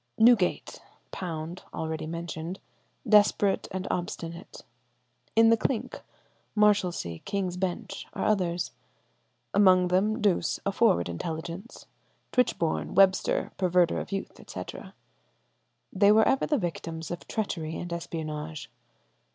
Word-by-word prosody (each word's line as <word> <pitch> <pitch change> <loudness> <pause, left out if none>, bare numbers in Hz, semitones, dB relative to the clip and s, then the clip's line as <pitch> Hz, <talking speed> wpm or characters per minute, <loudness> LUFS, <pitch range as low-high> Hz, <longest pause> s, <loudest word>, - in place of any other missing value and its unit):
"Newgate—Pound 180 -6 0
(already 160 -1 -3
mentioned), 170 +2 -5 0.5
desperate 205 -1 +4
and 190 0 -4
obstinate;... 170 0 -5 0.7
in 225 0 +6
the - - +7
Clink, 245 +1 -2 0.5
Marshalsea, 185 - +2
King's 195 -3 -2
Bench, 180 -1 -4
are - - -2
others; 175 -4 0 0.8
among 185 -3 +5
them 210 +5 +2
Douce, 200 -6 +1
a 200 - +1
forward 195 - +3
intelligence, 165 - -6 0.5
Tichborne, 195 -10 0
Webster, 190 0 +3
perverter 180 -2 +3
of - - -7
youth," 195 0 -4
etc. - - -8 1.0
They 200 +2 +5
were 220 +1 +5
ever 270 - +2
the 300 - +2
victims 165 - -4
of 175 - -6
treachery 165 -7 -3
and 175 -1 -5
espionage. 155 -5 -5
180 Hz, 110 wpm, -28 LUFS, 165-205 Hz, 1.0 s, the